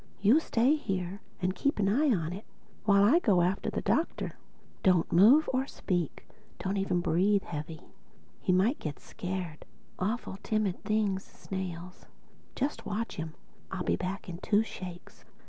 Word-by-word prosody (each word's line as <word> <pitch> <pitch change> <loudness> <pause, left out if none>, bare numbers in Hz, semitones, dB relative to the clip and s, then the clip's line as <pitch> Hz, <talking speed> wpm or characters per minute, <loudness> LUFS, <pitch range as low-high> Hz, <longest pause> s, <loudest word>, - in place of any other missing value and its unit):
You 215 +10 +6
stay 260 -1 +3
here 190 -6 -3 0.2
and 185 +1 +2
keep 280 +10 0
an 200 -2 +2
eye 280 +9 +3
on 170 -5 0
it 200 +4 -7 0.4
while 200 -1 +5
I 265 +12 +6
go 200 - +3
after 185 +3 0
the - - -3
Doctor. 330 - 0 0.5
Don't 180 -3 +3
move 235 - +7
or 260 +1 +1
speak—don't 185 - -4
even 185 -2 +1
breathe 195 +4 +2
heavy: 155 0 -6 0.6
he - - +1
might 195 +10 +3
get 150 -3 -4
scared—awful 185 +4 -5
timid 215 -4 -1
things, 205 -3 0
snails. 180 -2 -7 0.5
Just 275 -4 -2
watch 220 +3 -3
him; 160 -1 -5 0.3
and 190 - -4
I'll 180 - -2
be - - +2
back 185 +2 -4
in 175 -1 -6
two 205 +2 +3
shakes." 180 -5 -9
195 Hz, 150 wpm, -30 LUFS, 180-215 Hz, 0.6 s, move